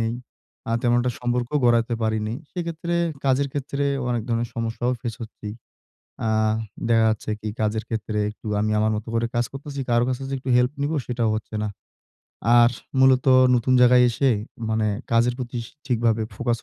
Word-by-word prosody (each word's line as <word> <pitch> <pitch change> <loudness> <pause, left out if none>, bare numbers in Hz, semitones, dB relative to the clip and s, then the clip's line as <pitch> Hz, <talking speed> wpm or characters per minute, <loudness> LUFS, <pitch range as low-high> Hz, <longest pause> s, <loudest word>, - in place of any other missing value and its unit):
নেই। 115 +1 -1 0.5
আ - - -1
তেমন 120 0 +3
একটা 125 0 0
সম্পর্ক 120 0 -1 0.2
গড়াতে 120 0 +3
পারিনি। 110 0 -1 0.2
সেক্ষেত্রে 170 -1 -3 0.3
কাজের 135 +1 +2
ক্ষেত্রে, 140 0 -2 0.2
অনেক 120 -2 0
ধরনের 115 0 0
সমস্যাও 115 +2 -1
ফেস 115 -2 -4
করছি। 110 -2 -8 0.8
আ - - +1 0.6
দেখা 115 -1 +4
যাচ্ছে 110 0 -2
কি? 110 - -4
কাজের 110 +1 0
ক্ষেত্রে 110 -1 -3
একটু 105 - -14
আমি 110 0 0
আমার 110 0 +2
মতো 110 +2 -6
করে 115 0 +1
কাজ 120 0 +2
করতেছি। 140 0 -6
কারো 120 0 +4
কাছে 130 +1 -2
যদি 135 0 -3
একটু 130 0 -4
হেল্প 125 +2 +3
নিবো 155 +2 0
সেটাও 120 -3 0
হচ্ছে 110 0 -8
না। 105 - -1 0.9
আর 120 0 +4 0.2
মূলত 130 0 +5 0.3
নতুন 125 +2 +2
জায়গায় 125 0 +7
এসে 135 +3 +2 0.4
মানে 110 0 +1 0.3
কাজের 120 +1 +3
প্রতি 120 -1 -4
স - - -9 0.2
ঠিকভাবে 115 -3 +1
ফোকাস 120 +1 -1
120 Hz, 175 wpm, -23 LUFS, 115-130 Hz, 0.9 s, জায়গায়